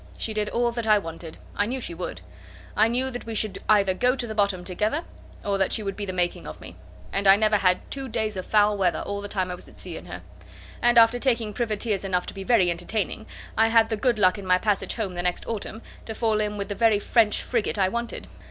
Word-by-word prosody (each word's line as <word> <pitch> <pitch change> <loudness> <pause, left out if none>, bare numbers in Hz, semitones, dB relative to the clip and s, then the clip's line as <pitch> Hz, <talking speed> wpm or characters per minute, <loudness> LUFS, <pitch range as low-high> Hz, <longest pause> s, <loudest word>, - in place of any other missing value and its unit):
She 220 - -3
did 210 -1 -1
all 240 0 +1
that 235 -1 -4
I 215 -1 +6
wanted. 165 -3 -7 0.2
I 205 - +1
knew 260 +3 -3
she 200 - -3
would. 170 - -6 0.5
I 220 - +5
knew 255 +3 0
that 245 -2 -7
we 225 - -4
should 215 -1 0
either 200 -3 +4
go 250 +6 +2
to 250 - -3
the 220 - -5
bottom 200 -4 0
together, 215 - -1 0.4
or 200 -1 0
that 190 - +1
she 215 - 0
would 195 -1 -3
be 205 -1 -5
the - - -2
making 175 - -2
of 75 - -8
me; - - -11 0.4
and 200 - +1
I 195 - +9
never 215 0 +3
had 185 -2 +3
two 270 -1 -3
days 220 -2 -1
of 185 - -5
foul 210 -1 +4
weather 180 -2 +1
all 200 0 -4
the 205 - -5
time 185 -3 -2
I - - -3
was 180 - -8
at - - -17
sea 175 -3 -6
in - - -11
her; 90 - -8 0.6
and 240 0 +4
after 230 +1 +6
taking 235 -5 0
privateers 215 -3 -1
enough 180 -2 0
to - - -6
be 195 - -7
very 190 -5 +3
entertaining, 200 +5 -3 0.3
I 225 +1 +4
had 225 0 +4
the 220 - 0
good 235 +2 +1
luck 185 0 +3
in 195 - -8
my 180 0 +5
passage 205 +1 -1
home 210 -5 -3
the 175 - -3
next 180 0 -1
autumn, 220 0 -5 0.2
to 220 - -6
fall 220 -2 +1
in 210 0 -2
with 200 0 -4
the - - -1
very 225 0 +3
French 215 +1 +2
frigate 230 -3 -1
I 190 -2 +3
wanted. 235 +2 -4
210 Hz, 255 wpm, -25 LUFS, 190-225 Hz, 0.6 s, I